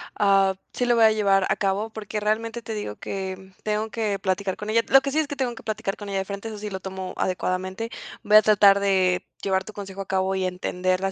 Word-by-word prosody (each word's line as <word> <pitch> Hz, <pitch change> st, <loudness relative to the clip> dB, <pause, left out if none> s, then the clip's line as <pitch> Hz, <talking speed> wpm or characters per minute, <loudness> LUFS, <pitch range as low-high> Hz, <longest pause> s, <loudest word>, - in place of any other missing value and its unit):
ah, 195 Hz, -1 st, +3 dB, 0.2 s
sí 245 Hz, -, 0 dB
lo 240 Hz, -, +3 dB
voy 230 Hz, -1 st, +6 dB
a 220 Hz, -, +6 dB
llevar 195 Hz, -3 st, +3 dB
a -, -, +3 dB
cabo, 200 Hz, +2 st, -1 dB
porque 215 Hz, -1 st, -5 dB
realmente 225 Hz, +2 st, -1 dB
te 225 Hz, -, -6 dB
digo 205 Hz, -, -4 dB
que 190 Hz, 0 st, -6 dB
tengo 215 Hz, +1 st, -1 dB
que 215 Hz, -3 st, -2 dB
platicar 190 Hz, 0 st, -1 dB
con 210 Hz, -, -6 dB
ella. 230 Hz, +1 st, +4 dB
Lo 270 Hz, -, +8 dB
que 275 Hz, 0 st, -3 dB
sí 310 Hz, -, +1 dB
es 310 Hz, -, 0 dB
que 285 Hz, -, -5 dB
tengo 250 Hz, -3 st, -1 dB
que -, -, -12 dB
platicar 215 Hz, -2 st, -3 dB
con 205 Hz, -1 st, -8 dB
ella 195 Hz, -, -2 dB
de 190 Hz, -, -2 dB
frente, 200 Hz, +3 st, -6 dB
eso 215 Hz, -, -7 dB
sí 210 Hz, 0 st, -5 dB
lo 190 Hz, -1 st, -5 dB
tomo 190 Hz, -1 st, -6 dB
adecuadamente. 185 Hz, +4 st, -2 dB, 0.3 s
Voy 210 Hz, +1 st, +7 dB
a -, -, +9 dB
tratar 205 Hz, -2 st, +6 dB
de 185 Hz, -2 st, +2 dB, 0.2 s
llevar 190 Hz, -1 st, 0 dB
tu 215 Hz, -, -9 dB
consejo 195 Hz, -1 st, -7 dB
a 195 Hz, -, -7 dB
cabo 190 Hz, 0 st, 0 dB
y 190 Hz, -, -1 dB
entenderla, 185 Hz, +1 st, -1 dB
200 Hz, 250 wpm, -24 LUFS, 190-215 Hz, 0.3 s, a